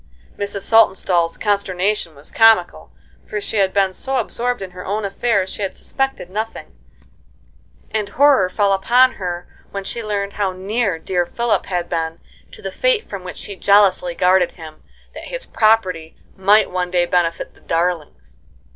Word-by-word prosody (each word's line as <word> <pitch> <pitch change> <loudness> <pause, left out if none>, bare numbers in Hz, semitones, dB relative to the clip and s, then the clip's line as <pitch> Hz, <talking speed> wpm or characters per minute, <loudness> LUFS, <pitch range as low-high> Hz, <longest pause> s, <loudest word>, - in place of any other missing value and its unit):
Mrs. 200 -1 -4
Saltonstall's 180 -6 +3
consternation 200 -4 0
was 140 +1 -13
comical, 225 -6 +3 0.4
for 210 - -3
she 215 - -4
had 195 -2 +3
been 195 -1 +1
so 265 +7 -3
absorbed 245 -1 -2
in 185 - -8
her 180 0 -9
own 205 +2 -2
affairs 200 -1 0
she 200 - -7
had 195 - -3
suspected 270 -8 -3
nothing; 215 +4 -6 1.2
and 210 -2 -2
horror 265 -6 +4
fell 200 +1 +2
upon 245 +6 +4
her 175 -4 -5 0.2
when 200 -1 -5
she 230 +4 -4
learned 200 -1 -2
how 195 -3 -1
near 195 0 -1
dear 175 +1 -1
Philip 235 +3 -1
had 175 -2 -2
been 165 -1 -3 0.3
to 440 -3 -13
the - - -4
fate - - +1
from 200 -3 -7
which 180 - -8
she 200 - -7
jealously 190 -3 +3
guarded 180 0 +3
him, 160 -3 -12 0.3
that - - -9
his - - -6
property 185 -8 +1 0.2
might 200 +3 +4
one 180 -1 -2
day 175 -1 +2
benefit 170 -1 -1
the - - -23
darlings. 165 - -3
195 Hz, 165 wpm, -19 LUFS, 180-215 Hz, 1.2 s, horror